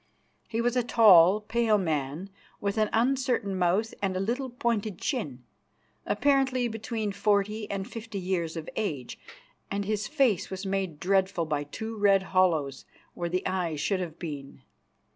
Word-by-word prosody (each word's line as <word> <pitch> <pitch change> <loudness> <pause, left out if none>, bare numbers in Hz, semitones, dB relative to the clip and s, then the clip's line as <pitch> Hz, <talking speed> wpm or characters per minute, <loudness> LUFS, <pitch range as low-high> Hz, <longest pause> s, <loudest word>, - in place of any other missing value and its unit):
He 230 0 -1
was 240 +1 +1
a 250 - +3
tall, 210 -5 +6
pale 220 0 +2
man, 160 +1 -2 0.3
with 200 +2 -1
an 215 -1 +2
uncertain 245 -4 +1
mouth 185 +5 +1
and 190 -2 0
a - - -1
little 245 +7 -2
pointed 225 -5 -1
chin, 145 - -3 0.6
apparently 265 -3 +2
between 220 -1 -3
forty 210 +1 0
and 195 0 -3
fifty 225 -3 -7
years 180 -3 -2
of 160 - -6
age, 145 - -3 0.5
and 200 0 -2
his 210 0 -1
face 265 - +1
was 190 +1 -5
made 190 -5 -2
dreadful 190 -2 +1
by 150 -2 -2
two 220 +10 -6
red 200 -2 +4
hollows 160 -8 +2 0.3
where 175 -1 -3
the 180 +2 -2
eyes 175 -5 -1
should 195 +5 0
have 170 -3 -5
been. 145 -5 -7
200 Hz, 155 wpm, -28 LUFS, 175-225 Hz, 0.6 s, tall